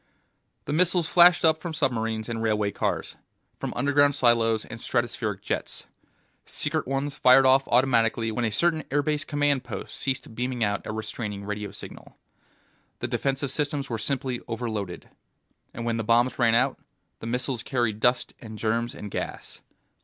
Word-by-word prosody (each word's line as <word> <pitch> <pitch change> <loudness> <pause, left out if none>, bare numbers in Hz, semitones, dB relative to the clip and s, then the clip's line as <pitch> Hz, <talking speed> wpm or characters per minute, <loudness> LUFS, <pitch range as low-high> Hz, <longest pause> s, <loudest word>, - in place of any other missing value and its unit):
The 145 - -3
missiles 175 0 +2
flashed 175 0 +6
up 160 0 +4
from 170 -2 -5
submarines 110 -5 -1
and 115 -1 -3
railway 105 -2 +1
cars, - - -2 0.4
from - - -3
underground 145 0 +3
silos 115 -4 +3
and 115 - -9
stratospheric 115 -5 -2
jets; - - -3 0.6
secret 155 -1 0
ones 135 +2 -2
fired 130 +1 +7
off 135 +1 +5
automatically 115 -2 +2
when 120 +2 -2
a 115 - +2
certain 160 +9 +2
airbase 145 +2 0
command 145 -3 +1
post 120 -3 -7
ceased 130 -4 -3
beaming 125 0 -2
out 100 -1 -1
a - - -2
restraining 105 -2 -5
radio 105 0 -4
signal. 100 - -10 0.8
The - - -3
defensive 135 0 -1
systems 145 -2 -2
were 115 - -2
simply 130 +1 -1
overloaded. 110 -6 -4 0.6
And 115 - -6
when 115 -1 0
the 115 - -2
bombs 120 +4 +2
ran 115 -2 +4
out, 130 +3 +2 0.4
the 115 - -7
missiles 125 0 -2
carried 120 -6 -1
dust 125 +2 +2
and 110 -2 -9
germs 115 +2 -1
and 105 - -8
gas. - - -6
120 Hz, 160 wpm, -26 LUFS, 110-140 Hz, 0.8 s, fired